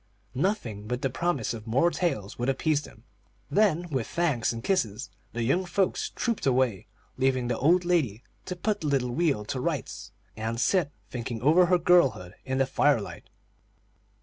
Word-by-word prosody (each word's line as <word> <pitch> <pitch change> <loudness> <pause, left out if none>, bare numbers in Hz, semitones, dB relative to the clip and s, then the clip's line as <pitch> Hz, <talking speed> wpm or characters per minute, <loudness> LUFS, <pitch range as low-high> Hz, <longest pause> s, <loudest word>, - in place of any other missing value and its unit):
Nothing 125 - -2
but 125 +4 -3
the 135 - 0
promise 155 -7 -1
of 110 -1 -8
more 135 +10 +3
tales 115 - -2
would 120 +2 0
appease 145 +2 +1
them; 110 -6 -14 0.5
then, 180 -5 +2
with 130 -5 -1
thanks 155 -9 0
and 115 -1 -6
kisses, 140 - -1 0.2
the 120 - -2
young 155 +11 +2
folks 185 +1 0
trooped 230 - -2
away, 125 -6 +1 0.3
leaving 130 -2 +1
the 120 - -1
old 175 +5 +3
lady 135 - +1 0.2
to 180 - -4
put 205 +3 -1
the 155 - -2
little 130 -4 +1
wheel 140 -7 0
to 130 - -3
rights, 150 -3 -3 0.2
and 115 +1 -3
sit 175 +1 +2 0.2
thinking 120 -1 -4
over 170 +6 +5
her 180 0 +4
girlhood, 165 - +3
in 130 0 -1
the 135 - +3
fire 140 0 +3
light. 100 - -9
135 Hz, 175 wpm, -27 LUFS, 120-175 Hz, 0.5 s, over